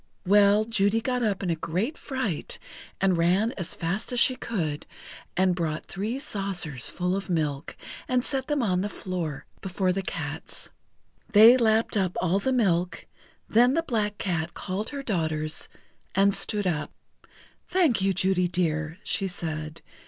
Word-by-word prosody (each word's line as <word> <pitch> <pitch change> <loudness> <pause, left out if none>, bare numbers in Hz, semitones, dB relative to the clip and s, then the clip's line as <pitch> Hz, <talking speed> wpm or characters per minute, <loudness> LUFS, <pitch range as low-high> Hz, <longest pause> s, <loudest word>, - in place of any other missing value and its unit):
Well, 205 +2 +5
Judy 215 -1 +2
got 250 +2 -1
up 205 -4 0
in 180 - 0
a - - +1
great 185 - -2
fright 260 - -3 0.4
and 190 -2 +3
ran 185 +7 +3
as 175 -4 -4
fast 185 +8 -3
as 245 - +1
she 255 - +4
could, 160 -13 -3 0.5
and 185 0 +4
brought 160 -3 -2
three 210 +6 -3
saucers 195 - -2
full 180 +1 -1
of 195 0 -4
milk, 150 -4 -1 0.3
and 255 -1 +1
set 265 -1 -2
them 295 -4 +1
on 185 -4 +1
the 205 - -2
floor 175 -8 -4 0.2
before 185 -1 0
the 195 - -1
cats. 190 - -6 0.6
They 220 +4 +9
lapped 225 -3 +2
up 185 -3 0
all 185 +2 +2
the 260 +6 0
milk, 180 -8 +1 0.4
then 245 +4 +4
the 330 - +1
Black 210 -7 -1
Cat 170 -3 -2
called 200 +3 -3
her 280 -1 -5
daughters 160 - -2 0.5
and 195 +1 +4
stood 200 +1 0
up. 160 -5 -1 0.8
"Thank 325 - +2
you, 195 0 +3
Judy 185 -1 +2
dear," 165 -2 -1
she 195 - -1
said. 160 -3 -5
195 Hz, 160 wpm, -26 LUFS, 170-220 Hz, 0.8 s, They